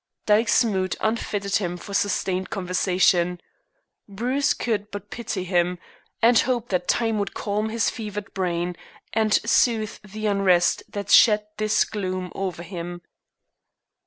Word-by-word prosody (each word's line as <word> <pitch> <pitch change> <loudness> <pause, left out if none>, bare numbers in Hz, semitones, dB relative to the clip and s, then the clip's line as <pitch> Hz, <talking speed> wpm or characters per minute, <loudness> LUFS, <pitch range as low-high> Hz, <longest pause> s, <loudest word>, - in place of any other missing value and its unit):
Dyke's 220 +3 +4
mood 190 -4 -1
unfitted 205 -3 -1
him 180 -3 -3
for 200 - -9
sustained 190 -2 0
conversation. 180 -2 +1 0.7
Bruce 250 +8 0
could 210 -3 -2
but 205 - -8
pity 225 -5 -4
him, 180 -1 +1 0.5
and 235 0 +6
hope 245 -2 0
that 180 -2 -1
time 225 -2 +1
would 200 - -3
calm 210 +1 -2
his 225 0 0
fevered 210 -3 -6
brain, 175 -2 -2 0.4
and 220 -1 +1
soothe 230 -2 +2
the 210 +1 -7
unrest 195 -4 +3
that 200 -1 -5
shed 210 -2 +6
this 215 0 +2
gloom 185 -3 -4
over 185 -3 -4
him. 175 -1 -7
200 Hz, 130 wpm, -24 LUFS, 180-220 Hz, 0.7 s, and